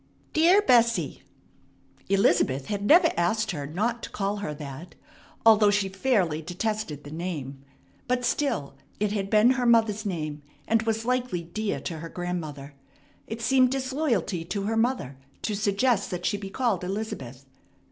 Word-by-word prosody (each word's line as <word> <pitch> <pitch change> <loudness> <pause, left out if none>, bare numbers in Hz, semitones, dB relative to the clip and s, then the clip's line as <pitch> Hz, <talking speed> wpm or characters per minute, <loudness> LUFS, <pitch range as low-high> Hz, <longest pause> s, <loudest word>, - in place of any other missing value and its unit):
"Dear 350 +6 +5
Bessie 235 - +3 0.5
" - - -33
Elizabeth 140 -9 +2
had 200 +4 -3
never 330 - +6
asked 215 +6 +1
her 145 -5 -5
not 225 +10 -1
to - - -6
call 200 +1 -2
her 200 -7 -4
that, 145 +3 -9 0.5
although 215 -2 +7
she 205 -1 +1
fairly 190 -6 +1
detested 180 -2 -3
the 145 - -10
name. 150 -5 -5 0.4
But 250 -1 0
still 235 - -1 0.3
it 210 0 0
had 195 -2 -2
been 215 +3 +5
her 255 -1 0
mother's 220 -3 +3
name, 155 -7 -4 0.3
and 225 0 +3
was 225 0 -1
likely 250 -8 -1
dear 200 +5 -3
to 165 -3 -5
her 165 +1 -7
grandmother. 155 -6 -5 0.5
It 225 +1 -6
seemed 255 +1 +4
disloyalty 260 - -1
to 200 +3 -3
her 220 +3 -1
mother 225 - 0 0.3
to 215 - -1
suggest 205 +2 +1
that 180 -1 -4
she - - +1
be 200 -1 -6
called 215 -4 0
"Elizabeth." 180 - -5
205 Hz, 155 wpm, -26 LUFS, 170-230 Hz, 0.5 s, although